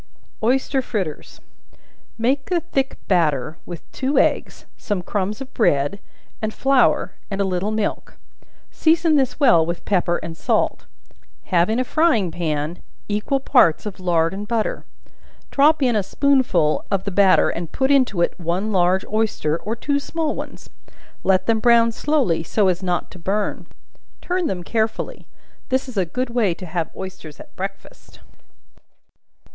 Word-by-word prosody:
Oyster 265 +3 +1
Fritters. 190 - -5 0.8
Make 265 +5 0
a 355 -2 +2
thick 270 -6 -2
batter 155 -5 +1
with 175 -3 -7
two 270 +1 -1
eggs, - - +1
some 195 -4 -3
crumbs 205 +4 -2
of 270 +1 -8
bread 145 - +1 0.4
and 215 0 -1
flour, 270 +1 +2 0.2
and 195 -2 -4
a - - +3
little 190 +1 -1
milk; 215 -1 -3 0.5
season 325 0 +3
this 265 -1 +1
well 235 - +5
with 170 +1 -4
pepper 175 -3 +1
and 165 0 -7
salt; - - 0 0.6
have 175 +1 +2
in 220 - +1
a - - +2
frying 255 - +2
pan 160 -1 -3 0.3
equal 210 +6 0
parts 245 - +3
of 205 -3 -6
lard 170 -2 +1
and 205 +2 -6
butter; 225 -1 -2 0.7
drop 295 +1 +4
in 245 -3 +2
a 210 - +3
spoonful 250 - +2
of 195 -2 0
the 200 - -3
batter 195 0 +4
and 170 -1 -5
put 265 +1 +1
into 255 -10 +3
it - - 0
one 180 +5 -1
large 185 0 +2
oyster, 215 -8 0
or 220 +2 -4
two 285 +4 -1
small 315 +2 -2
ones, - - -8 0.5
let 190 -1 +2
them 225 -1 +2
brown 230 0 +5
slowly, 255 - +1
so 190 +4 +1
as 180 0 -1
not 180 -2 -2
to 185 - -12
burn; 200 +5 -2 0.5
turn 360 -1 -1
them 180 -2 -3
carefully. 220 - -2 0.4
This 260 +1 0
is 255 - -9
a 190 -3 +1
good 250 +7 -3
way 220 -8 +1
to 185 - -9
have 170 -1 -3
oysters 185 -6 -8
at - - -14
breakfast. 195 +1 -8
205 Hz, 155 wpm, -21 LUFS, 175-260 Hz, 0.8 s, well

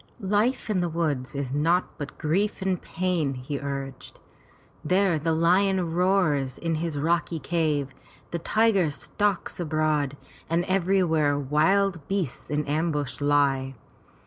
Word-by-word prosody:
"Life 225 +6 +1
in 210 -4 0
the 175 -1 0
woods 150 -6 -2
is 135 -2 -3
naught 165 +5 +1
but 145 -1 -6
grief 190 +6 0
and 190 -2 0
pain," 170 -6 -1
he 135 +3 -5
urged. 140 -1 -6 0.6
"There 180 0 +2
the 165 +2 0
lion 180 +1 +2
roars 170 -8 +1
in 165 -1 -2
his 160 -1 -2
rocky 165 +2 0
cave, 150 -3 -1 0.4
the 170 - -2
tiger 200 -1 +2
stalks 200 +7 -2
abroad, 155 -3 0 0.3
and 170 +2 +1
everywhere 175 -6 +2
wild 160 +5 +1
beasts 190 -9 -2
in 150 0 -1
ambush 150 -2 -1
lie. 140 -2 +2
160 Hz, 130 wpm, -26 LUFS, 145-185 Hz, 0.6 s, There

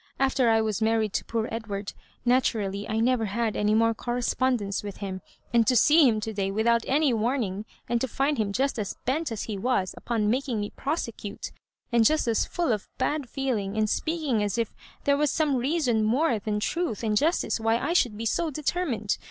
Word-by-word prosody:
After 265 -2 +3
I 225 0 +4
was 215 -1 -1
married 220 -2 +1
to - - -1
poor 225 -1 -2
Edward, 205 -3 -4 0.3
naturally 215 -5 +1
I 220 +1 0
never 240 0 +2
had 220 +2 -1
any 210 +1 +2
more 230 +1 +3
correspondence 240 -3 -1
with 205 -2 -7
him; 190 -2 -5 0.3
and 230 -2 +4
to 255 - +4
see 295 +3 +6
him 220 -2 0
to 220 +1 -4
day 195 -2 -1
without 230 +3 +2
any 285 -1 +3
warning, 220 -3 -1 0.2
and 235 -1 0
to 260 - 0
find 275 +2 0
him 205 -2 0
just 265 +3 0
aa 210 - -1 0.2
bent 285 +3 0
as 220 - -3
he 210 -3 -4
was 195 -5 0
upon 225 -3 -1
making 255 -2 -1
me 205 0 -3
prosecute, 230 -8 -4 0.4
and 235 -1 +4
just 305 +2 +3
as 225 -2 +2
foil 345 -7 0
of 210 -3 -2
bad 275 0 -1
feeling, 220 -7 -2
and 215 -1 +1
speaking 310 -9 0
as 205 +1 -1
if 230 -2 -1 0.3
there 280 0 +3
was 300 0 +2
some 295 -2 +1
reason 250 -4 +1
more 240 +2 +2
than 210 0 -2
truth 310 - -2
and 215 -2 +1
justice 310 0 +1
why 225 +1 +2
I 330 - -1
should 240 -11 +2
be 225 - -4
so 330 +8 0
determined. 290 - -1
230 Hz, 200 wpm, -26 LUFS, 215-270 Hz, 0.4 s, see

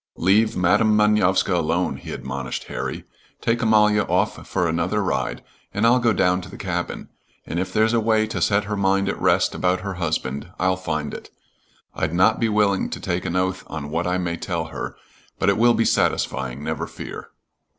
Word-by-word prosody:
"Leave 105 +5 +3
Madam 105 +4 +3
Manovska 105 -3 +3
alone," 85 +1 0
he - - -9
admonished 65 0 -5
Harry. - - -5 0.4
"Take 115 0 0
Amalia 105 -1 +4
off - - -1
for 90 -3 0
another 85 +6 0
ride, 95 - -2 0.3
and 105 +2 +2
I'll 120 +2 +5
go 120 -2 +3
down 90 -2 +2
to 90 - -10
the - - -10
cabin, 90 -2 -4 0.4
and 85 - -3
if 95 +1 -3
there's 110 +3 +2
a 115 - +3
way 110 -1 +2
to 110 - -4
set 100 0 +2
her 105 +1 -3
mind 100 0 +1
at - - -4
rest - - +3
about 90 0 0
her 100 0 -4
husband, 75 -2 -2
I'll 95 +1 +2
find 80 -5 -3
it. - - -8 0.6
I'd 80 +1 -2
not 95 +5 +4
be 115 - +1
willing 105 -2 +2
to - - -5
take 90 -1 -2
an 85 - -2
oath 95 0 0
on 75 -2 -6
what 85 +3 -1
I 90 +1 +1
may 85 -2 -2
tell 85 -2 -3
her, - - -5 0.4
but - - +2
it 100 - +2
will 120 +1 +5
be 115 - +2
satisfying, 65 +1 0
never 80 +1 -3
fear." - - -8
95 Hz, 195 wpm, -22 LUFS, 85-105 Hz, 0.6 s, I'll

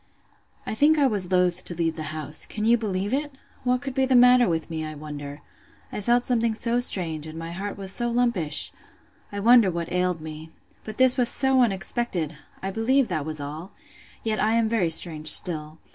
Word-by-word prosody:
I - - -4
think 295 +7 +3
I 290 - +3
was 200 -7 0
loath 180 -1 +1
to 175 - -6
leave 165 -1 -1
the 155 - -6
house. 155 -1 -2
Can 215 -1 -4
you 235 +1 +5
believe 205 -1 -3
it?—What 270 -3 -3
could 270 -2 -5
be 265 0 +1
the 260 - +2
matter 245 -1 +6
with 165 -1 -2
me, 160 -1 -5
I 155 0 -6
wonder?—I 145 +5 -10
felt 240 +3 +2
something 230 -2 +1
so 235 +2 0
strange, 165 -10 -3
and 155 +1 -9
my 165 0 -6
heart 195 +4 -6
was 195 -1 -3
so 240 +4 -1
lumpish!—I 220 -3 -2
wonder 230 -1 +5
what 170 -1 -4
ailed 180 -1 0
me!—But 160 +7 -11
this 260 0 +4
was 245 -2 +3
so 265 -1 +3
unexpected!—I 190 -5 -3
believe 230 +4 +1
that 155 -4 -3
was 155 -1 -4
all!—Yet 170 +7 -7
I 220 +1 +1
am 230 -1 +2
very 220 -7 0
strange 160 -1 +1
still. 155 -2 +3
195 Hz, 180 wpm, -24 LUFS, 160-240 Hz, -, matter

